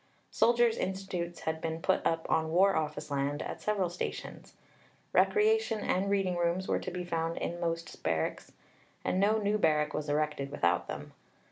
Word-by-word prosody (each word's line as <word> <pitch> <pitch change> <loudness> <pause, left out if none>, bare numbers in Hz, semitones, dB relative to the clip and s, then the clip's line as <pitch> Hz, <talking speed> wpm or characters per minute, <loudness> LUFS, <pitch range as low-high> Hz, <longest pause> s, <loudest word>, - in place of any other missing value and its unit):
Soldiers' 235 -1 +3
Institutes 185 -2 -3
had 160 0 -2
been 160 0 -2
put 190 +3 +1
up 165 0 -1
on 160 0 +1
War 195 +4 +4
Office 150 -1 -2
land 140 +1 -1
at - - -6
several 205 -3 +1
stations. 175 +1 -6 0.6
Recreation 430 - +3
and 195 +2 0
reading 195 -3 +1
rooms 175 +2 0
were - - +1
to - - -5
be 180 0 -4
found 165 -1 -2
in 175 - -3
most 165 -1 -3
barracks, 80 -1 -1 0.5
and 185 - +1
no 210 +3 +4
new 210 0 +1
barrack 150 -4 +2
was 150 -1 -3
erected 150 -2 0
without 90 -9 +1
them. - - -7
170 Hz, 165 wpm, -31 LUFS, 155-195 Hz, 0.6 s, War